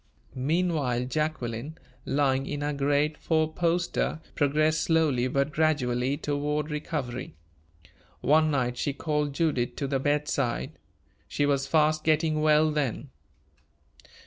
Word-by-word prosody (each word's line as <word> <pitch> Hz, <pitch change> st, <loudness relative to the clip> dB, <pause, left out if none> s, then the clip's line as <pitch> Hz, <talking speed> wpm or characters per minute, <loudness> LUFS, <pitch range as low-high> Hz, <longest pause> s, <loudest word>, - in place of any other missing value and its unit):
Meanwhile 140 Hz, -3 st, 0 dB
Jacqueline, 145 Hz, -1 st, -3 dB, 0.3 s
lying 135 Hz, -1 st, +1 dB
in 145 Hz, -1 st, -4 dB
her 145 Hz, 0 st, -1 dB
great 145 Hz, +2 st, +1 dB
four 160 Hz, -1 st, 0 dB
poster, 170 Hz, -1 st, 0 dB
progressed 155 Hz, +2 st, +2 dB
slowly 150 Hz, -7 st, +2 dB
but 140 Hz, +3 st, 0 dB
gradually 140 Hz, -4 st, +1 dB
toward 150 Hz, +1 st, -2 dB
recovery. 140 Hz, -, -4 dB, 0.9 s
One 155 Hz, +1 st, +4 dB
night 125 Hz, -4 st, 0 dB
she 145 Hz, -, -1 dB
called 150 Hz, 0 st, -1 dB
Judith 145 Hz, -7 st, 0 dB
to 140 Hz, -, -3 dB
the 135 Hz, 0 st, 0 dB
bedside. 140 Hz, -, -1 dB, 0.6 s
She 145 Hz, -, 0 dB
was 140 Hz, -1 st, +1 dB
fast 155 Hz, +1 st, +2 dB
getting 155 Hz, 0 st, +2 dB
well 155 Hz, 0 st, +4 dB
then. 140 Hz, -2 st, -2 dB
150 Hz, 120 wpm, -27 LUFS, 135-155 Hz, 0.9 s, One